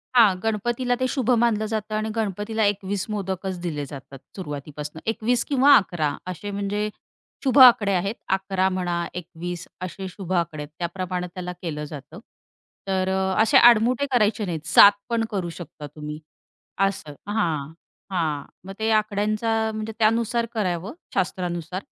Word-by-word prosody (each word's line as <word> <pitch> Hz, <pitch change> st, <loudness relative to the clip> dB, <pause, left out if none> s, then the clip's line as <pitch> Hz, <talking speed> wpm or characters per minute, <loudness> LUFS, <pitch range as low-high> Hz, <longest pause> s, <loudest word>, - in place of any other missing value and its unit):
हां, 220 Hz, -6 st, +7 dB
गणपतीला 240 Hz, +3 st, 0 dB
ते 255 Hz, -, +1 dB
शुभ 255 Hz, -3 st, -1 dB
मानलं 220 Hz, -2 st, +2 dB
जातं 215 Hz, -1 st, -3 dB
आणि 215 Hz, +1 st, -1 dB
गणपतीला 220 Hz, +1 st, -1 dB
21 195 Hz, -1 st, -4 dB
मोदकच 190 Hz, -2 st, -3 dB
दिले 150 Hz, -5 st, -3 dB
जातात 135 Hz, -1 st, -10 dB, 0.2 s
सुरुवातीपासून. 150 Hz, -3 st, -6 dB
21 230 Hz, +2 st, +1 dB
किंवा 280 Hz, 0 st, +6 dB
11 160 Hz, -6 st, 0 dB, 0.2 s
असे 185 Hz, +3 st, -5 dB
म्हणजे 205 Hz, +1 st, -2 dB, 0.5 s
शुभ 265 Hz, -1 st, +2 dB
आकडे 235 Hz, -6 st, +8 dB
आहेत 195 Hz, +4 st, 0 dB, 0.2 s
11 190 Hz, -1 st, 0 dB
म्हणा, 175 Hz, -2 st, -1 dB
21 175 Hz, 0 st, -6 dB
असे 185 Hz, +1 st, -5 dB
शुभ 185 Hz, 0 st, -6 dB
आकडे 170 Hz, -4 st, -1 dB
आहेत 145 Hz, -, -10 dB
त्याप्रमाणे 180 Hz, +1 st, -3 dB
त्याला 180 Hz, -1 st, -5 dB
केलं 150 Hz, -4 st, -4 dB
जातं. 150 Hz, +4 st, -9 dB, 0.7 s
तर 190 Hz, -1 st, 0 dB
अ, 190 Hz, 0 st, 0 dB
असे 245 Hz, +5 st, +5 dB
आडमुठे 240 Hz, +2 st, +6 dB
करायचे 215 Hz, -3 st, +2 dB
नाहीत, 165 Hz, -4 st, -4 dB
7 205 Hz, -, +9 dB, 0.2 s
पण 230 Hz, -1 st, +1 dB
करू 185 Hz, -4 st, -2 dB
शकता 150 Hz, -3 st, -9 dB
तुम्ही. 150 Hz, 0 st, -6 dB, 0.7 s
असं 170 Hz, -6 st, -6 dB, 0.2 s
हां. 160 Hz, -8 st, -1 dB, 0.4 s
हां. 155 Hz, -5 st, -1 dB, 0.2 s
मग 195 Hz, -, -6 dB
ते 220 Hz, 0 st, 0 dB
आकड्यांचा 215 Hz, +1 st, +1 dB
म्हणजे 215 Hz, 0 st, -4 dB
त्यानुसार 230 Hz, +2 st, +2 dB
करावं 190 Hz, -3 st, -2 dB, 0.2 s
शास्त्रानुसार, 180 Hz, -1 st, -2 dB
195 Hz, 145 wpm, -24 LUFS, 175-220 Hz, 0.7 s, 7